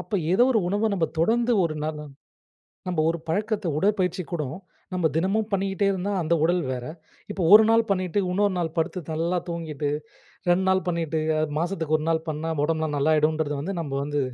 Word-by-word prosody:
அப்ப 180 +3 -3 0.2
ஏதோ 240 +6 +5
ஒரு 230 - +3
உணவ 205 +4 +1
நம்ம 170 -4 +1
தொடர்ந்து 235 +7 +2
ஒரு 155 -2 -2
நாள் 155 0 -3 0.9
நம்ம 175 -3 0
ஒரு 170 - -1
பழக்கத்த 210 +3 -1
உடற்பயிற்சி 185 -1 +1
கூடம். 150 -4 -3 0.4
நம்ம 180 -3 +2
தினமும் 200 +6 0
பண்ணிட்டே 195 0 0
இருந்தா 190 +1 -2
அந்த 165 +1 +1
உடல் 175 +2 +2
வேற. 125 -1 -4 0.5
இப்போ 195 - -4
ஒரு 220 +1 +10
நாள் 225 0 +5
பண்ணிட்டு, 185 0 0
இன்னொரு 200 +1 +1
நாள் 165 -2 -2
படுத்து, 180 +3 -1
நல்லா 170 +3 0
தூங்கிட்டு. 155 -4 -3 0.6
2 180 +2 +3
நாள் 190 -2 +2
பண்ணிட்டு, 165 -2 -1 0.2
அ - - +1 0.2
மாசத்துக்கு 165 -3 0
1 155 - -5
நாள் 160 0 0
பண்ணா 155 +1 -3
உடம்பெல்லாம் 160 -1 -1
நாள்ளாயிடுன்றது 155 0 +2
வந்து 190 +6 -3
நம்ம 145 -4 -5
வந்து, 145 0 -1
170 Hz, 175 wpm, -25 LUFS, 160-195 Hz, 0.9 s, ஒரு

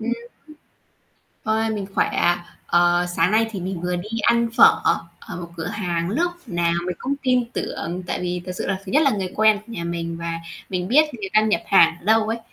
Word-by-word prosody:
Ừm. 240 +2 -2 1.3
Ôi, 220 +1 +1
mình 205 -3 -3
khỏe - - +3
ạ. 175 0 +1 0.2
Ờ, 175 0 +3
sáng 165 +3 +3
nay 220 +1 +3
thì 195 -4 -5
mình 185 -1 -4
vừa 180 +1 -1
đi 175 +4 -6
ăn 235 +1 +3
phở - - +7 0.4
ở - - -7
một 170 -1 -7
cửa 160 0 -4
hàng 175 -4 -2
lúc 345 - 0
nào 170 -4 0
mình 180 -2 -3
cũng 275 +2 -2
tin 250 -2 +2
tưởng 175 -5 -4
tại - - -3
vì 180 0 -3
thật 180 - -4
sự - - -4
là 190 - -2
thứ 190 - -7
nhất 300 - +5
là 275 - +4
người 190 -4 -3
quen 215 0 +5
của 230 - -10
nhà 170 -7 -5
mình 170 -1 -3
và 165 0 -4 0.3
mình 180 -1 -3
biết 295 +7 +6
người 205 -5 -5
ta 215 - +6
nhập 215 0 +1
hàng 165 -4 +5
ở - - -20
đâu 220 0 +3
ấy, 225 +1 -1
190 Hz, 225 wpm, -22 LUFS, 175-220 Hz, 1.3 s, phở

